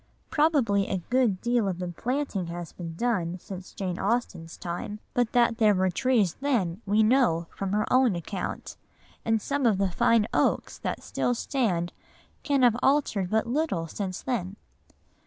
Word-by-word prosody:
Probably 280 -11 +2
a 190 -3 -2
good 245 -7 +2
deal 240 -3 +1
of 185 -3 -2
the 180 -1 -4
planting 240 - -2
has 170 0 -6
been 165 -2 -7
done 185 -5 -1
since 185 0 -9
Jane 185 -3 -4
Austen's 195 -6 -2
time, 180 +4 -5
but 245 -2 +1
that 235 -1 +3
there 210 -2 +5
were 185 0 +2
trees 215 -3 +2
then 220 -10 0
we 210 +2 +4
know 215 -8 +3
from 195 -1 -3
her 210 0 +2
own 255 -6 +4
account, 180 +2 -5 0.5
and 225 0 +2
some 280 +3 0
of 210 -4 +3
the 195 -1 +1
fine 230 +2 +3
oaks - - +1
that - - -4
still 245 - -1
stand 200 -10 -1 0.5
can 280 -3 +1
have 240 -2 +5
altered 265 -10 +2
but 220 +2 +1
little 240 - -1
since 185 +2 -5
then. 200 -7 -2
210 Hz, 165 wpm, -27 LUFS, 180-245 Hz, 0.5 s, there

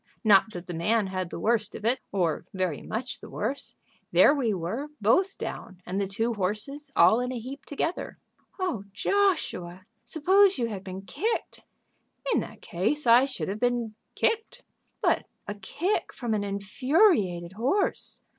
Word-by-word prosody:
Not 215 0 +5
that 175 0 -7
the 175 - -6
man 210 +6 +1
had 185 -2 -3
the - - -6
worst 215 +2 +1
of 215 - -7
it, 250 +3 +2
or 175 -6 0
very 185 -6 -1
much 245 +3 -4
the - - -11
worse. 255 +7 -4 0.4
There - - +7
we 260 -7 +1
were 200 - -3
both 365 - +3
down, 185 - -6
and 190 +3 -2
the 195 - -1
two 225 +5 0
horses, 215 +9 -2
all 180 +7 +6
in 250 +1 -2
a 255 - -3
heap 265 +4 -8
together." 325 +4 -3 0.4
"Oh, 355 - -2
Joshua, 205 - 0 0.2
suppose 385 +5 +4
you 240 - 0
had 195 -3 -6
been 190 0 -7
kicked!" 330 - -3 0.7
"In - - +3
that - - -8
case 220 +13 -1
I 240 +2 +7
should 270 -2 -4
have 200 +2 -3
been 240 -2 0 0.2
kicked." 450 -1 -1 0.4
"But - - +2 0.2
a 205 - -2
kick 295 - -2
from 240 -4 -3
an 210 -1 0
infuriated 200 - +2
horse!" 265 - -1
225 Hz, 165 wpm, -27 LUFS, 190-280 Hz, 0.7 s, There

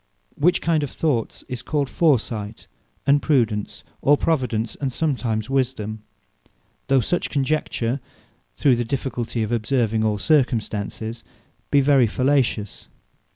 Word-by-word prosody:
Which 175 +5 +2
kind 165 -2 +2
of 145 - -2
thoughts, 135 -9 -1
is 125 -2 -5
called 145 0 -1
Foresight, 115 -9 0 0.4
and 140 +1 +4
Prudence, 115 -8 0 0.2
or 145 +1 +5
Providence; 120 -9 0
and 135 -2 -1
sometimes 120 -7 -1
Wisdome; 125 -5 -1 0.9
though 135 -1 +4
such 175 +10 -1
conjecture, 140 -3 -1 0.6
through 130 -4 +3
the 120 - 0
difficulty 120 -2 -2
of 110 - -3
observing 115 -1 +1
all 105 -1 +1
circumstances, 115 -3 0 0.5
be 140 - +4
very 135 -3 +4
fallacious. 125 -4 0
125 Hz, 120 wpm, -22 LUFS, 110-140 Hz, 0.9 s, or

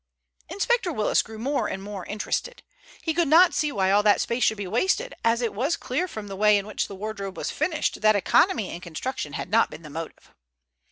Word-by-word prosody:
Inspector 450 -2 0
Willis 215 -8 +2
grew 220 0 -10
more 275 +6 -1
and 195 - -5
more 200 -3 -7
interested. 350 - -3 0.4
He 320 - 0
could 340 -1 +1
not 340 +5 +6
see 300 -1 0
why 190 -5 +1
all 205 +1 +5
that 210 -1 +4
space 235 +1 -1
should 220 - +2
be 200 - -4
wasted, 380 - 0
as 230 +1 +2
it 230 - -1
was 270 +11 0
clear 265 +8 -2
from 215 - -7
the 195 - -6
way 210 +1 +4
in 200 - -3
which 215 - -3
the 200 - -8
wardrobe 200 -1 -6
was - - -3
finished 310 -4 -1
that 215 0 +5
economy 220 - +2
in 170 - -7
construction 170 - -5
had 180 - -5
not 225 +2 +4
been 155 +2 -11
the 150 - -10
motive. 165 +2 -8
215 Hz, 220 wpm, -25 LUFS, 200-295 Hz, 0.4 s, not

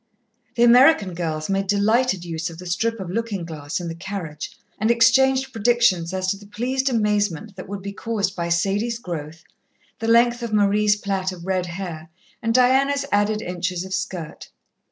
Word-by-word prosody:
The 235 - +3
American 240 - +6
girls 160 -3 -3
made 195 0 -1
delighted 205 -1 +2
use 165 0 -3
of 165 - -11
the 180 - -10
strip 225 +6 -1
of 185 -2 -5
looking 210 -4 -3
glass 155 -2 -5
in 175 - -5
the 165 - -4
carriage, 170 -4 -6 0.3
and 215 +2 +1
exchanged 260 +3 +4
predictions 220 -7 +2
as 185 0 -2
to 200 - -3
the 205 0 -15
pleased 260 +5 -1
amazement 210 -3 0
that 185 - -9
would 200 -1 -6
be 200 0 -5
caused 205 -3 -2
by 170 -1 -3
Sadie's 200 +7 0
growth, 165 -6 -7 0.6
the 225 - -3
length 240 +1 +4
of 235 -2 -4
Marie's 210 0 +3
plait 195 -2 -2
of 175 -2 -10
red 185 -1 -1
hair, 170 -3 -6 0.3
and 230 - 0
Diana's 270 +3 +3
added 210 +1 +1
inches 180 0 -3
of 190 - -6
skirt. 180 -4 -5
200 Hz, 175 wpm, -22 LUFS, 175-230 Hz, 0.6 s, American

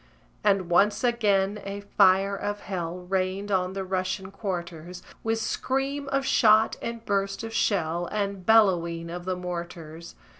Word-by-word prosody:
And 195 -3 +2
once 200 +7 +3
again 210 -4 +1
a 200 +1 -5
fire 195 0 +3
of 205 +1 -4
hell 180 -2 -4
Rained 190 +2 -2
on 185 -1 +1
the 195 0 -3
Russian 190 0 -3
quarters, 180 -3 -5 0.2
With 225 0 0
scream 270 +5 -2
of 275 -1 0
shot, 220 -4 +4
and 230 -1 -5
burst 195 +1 -1
of 225 0 -6
shell, 175 -5 0
And 200 -2 -2
bellowing 170 -6 +3
of 175 0 -6
the 185 0 -1
mortars! 170 -2 -7
195 Hz, 145 wpm, -26 LUFS, 180-210 Hz, 0.2 s, shot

